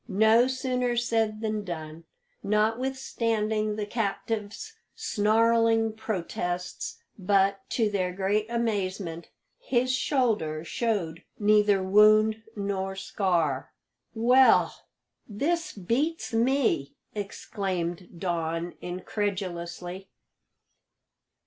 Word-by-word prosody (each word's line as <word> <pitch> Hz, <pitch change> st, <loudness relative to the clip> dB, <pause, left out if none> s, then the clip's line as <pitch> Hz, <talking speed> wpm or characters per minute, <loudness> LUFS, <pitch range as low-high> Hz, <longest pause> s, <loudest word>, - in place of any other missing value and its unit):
No 220 Hz, +3 st, +4 dB
sooner 250 Hz, -2 st, -1 dB
said 225 Hz, -2 st, 0 dB
than 215 Hz, -1 st, -2 dB
done, 160 Hz, -3 st, -7 dB, 0.4 s
notwithstanding 220 Hz, -1 st, 0 dB
the 210 Hz, -1 st, -3 dB
captive's 220 Hz, -, -3 dB, 0.2 s
snarling 225 Hz, -, +2 dB
protests; 180 Hz, -4 st, -4 dB, 0.2 s
but, 195 Hz, +1 st, +2 dB
to 225 Hz, -3 st, +1 dB
their 190 Hz, -3 st, -1 dB
great 200 Hz, +3 st, 0 dB
amazement, 195 Hz, -7 st, -2 dB, 0.3 s
his 255 Hz, -, +1 dB
shoulder 220 Hz, -, 0 dB
showed 185 Hz, -4 st, -2 dB
neither 210 Hz, -2 st, +4 dB
wound 215 Hz, +3 st, +5 dB
nor 195 Hz, -2 st, -2 dB
scar. 175 Hz, -8 st, -1 dB, 0.4 s
"Well, 250 Hz, +4 st, +5 dB, 0.6 s
this 320 Hz, +11 st, -1 dB
beats 245 Hz, -, -2 dB
me!" 230 Hz, -, +1 dB, 0.2 s
exclaimed 190 Hz, -4 st, -4 dB
Don 170 Hz, -1 st, -2 dB
incredulously. 180 Hz, -1 st, -4 dB
210 Hz, 80 wpm, -27 LUFS, 185-230 Hz, 0.6 s, wound